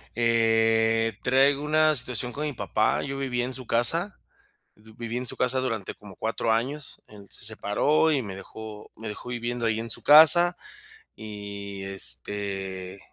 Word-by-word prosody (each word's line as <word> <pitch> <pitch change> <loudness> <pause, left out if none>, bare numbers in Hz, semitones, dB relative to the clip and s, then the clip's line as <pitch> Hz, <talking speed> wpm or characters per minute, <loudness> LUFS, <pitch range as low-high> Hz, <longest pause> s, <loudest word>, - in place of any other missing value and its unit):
eh, 115 -1 +2
traigo 135 +3 +2
una 155 +1 +3
situación 125 -1 -2
con 150 +3 -4
mi 145 - -3
papá, 110 0 -1
yo 135 0 -5
viví 130 -3 -2
en 125 +1 -3
su 130 -1 -7
casa, 165 - +2 0.6
viví 110 +2 -8
en 125 - -4
su - - +2
casa 125 +1 0
durante 115 -7 -3
como 100 -2 -12
4 115 0 -2
años, 135 +6 -3
él 100 -2 -14
se - - -7
separó 110 +9 +1
y 145 -3 +1
me 100 -5 -7
dejó 105 +1 -11
me 115 - -6
dejó 105 +3 -8
viviendo 120 0 -4
ahí 110 -1 0
en 115 +1 -6
su - - -2
casa 175 +4 +8 0.6
y, 100 -2 -8
este, 95 +3 -3
115 Hz, 160 wpm, -25 LUFS, 105-130 Hz, 0.6 s, casa